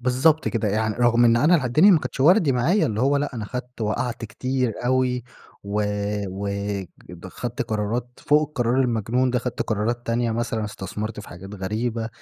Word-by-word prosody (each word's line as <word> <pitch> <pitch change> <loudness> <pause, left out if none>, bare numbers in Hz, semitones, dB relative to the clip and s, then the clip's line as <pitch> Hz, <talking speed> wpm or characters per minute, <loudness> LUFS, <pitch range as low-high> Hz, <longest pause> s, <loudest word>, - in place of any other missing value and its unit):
بالضبط 130 +6 +2
كده 115 -3 -1
يعن 110 +2 0
رغم 120 +1 +3
إن 115 0 +5
أنا 150 +8 +4
اله 155 -6 +2
الدنيا 155 +11 +5
ما 175 - +6
كانتش 140 - -6
وردي 165 0 +5
معايا، 155 - +2
اللي 110 -1 -2
هو 140 +3 +3
لأ، 145 -1 -2
أنا 110 -3 -4
خدت 125 +2 -7
وقعت 115 +2 -2
كتير 130 +2 -2
أوي، 125 -1 +1 0.4
و 105 +1 -1 0.5
و 100 +2 -4 0.6
د 90 +1 -10
خدت 120 +5 -4
قرارات 110 +3 -2 0.2
فوق 150 +1 +4
القرار 125 -2 0
المجنون 125 +1 +1
ده، 125 - +1
خذت 125 0 -3
قرارات 115 +3 -2
تانية 115 0 0
مثلًا 115 -1 -2
استثمرت 105 +1 -5
في 105 - -12
حاجات 95 +3 -10
غريبة، 110 +4 -2
120 Hz, 180 wpm, -23 LUFS, 110-130 Hz, 0.6 s, ما